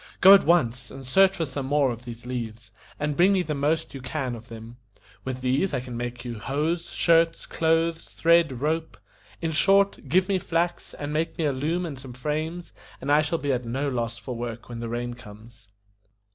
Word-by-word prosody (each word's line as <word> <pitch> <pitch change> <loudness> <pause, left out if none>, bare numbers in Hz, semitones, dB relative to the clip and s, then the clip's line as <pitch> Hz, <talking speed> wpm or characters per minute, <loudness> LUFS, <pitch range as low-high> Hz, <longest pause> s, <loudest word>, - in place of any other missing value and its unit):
Go 190 +2 +10
at 200 - +6
once 125 -7 +2
and 135 0 -10
search 190 +8 +4
for 165 - 0
some 135 -1 -5
more 140 -2 +3
of 120 +1 -8
these 120 0 -9
leaves, 115 -3 -5 0.3
and 150 0 -1
bring 180 +6 +5
me 185 -2 +2
the 155 - -3
most 150 +3 0
you 135 - -7
can 130 0 -3
of 115 0 -9
them. 115 0 -10 0.5
With 130 -1 -4
these 135 +7 +1
I - - 0
can 125 -1 -7
make 120 0 -5
you 120 -3 -5
hose, 155 +8 -1
shirts, 165 -1 +3
clothes, 165 0 +1
thread, 165 -6 +3
rope; 160 +2 -1 0.5
in 165 - 0
short, 195 +5 +3
give 185 +1 +3
me 195 -2 +1
flax, 170 0 -2
and 145 0 -5
make 160 +2 -1
me 160 - 0
a 145 - +1
loom 160 +7 -1
and 145 -6 -6
some 130 -2 -9
frames, 155 +6 -4 0.3
and 140 - -2
I 150 +1 +6
shall 155 +2 -1
be 145 -3 -1
at 125 0 -1
no 135 +5 -2
loss 115 -2 -2
for 120 +2 -6
work 120 0 -6
when 120 -1 -6
the 115 0 -4
rain 120 +1 -3
comes." 115 0 -14
140 Hz, 210 wpm, -25 LUFS, 120-165 Hz, 0.5 s, Go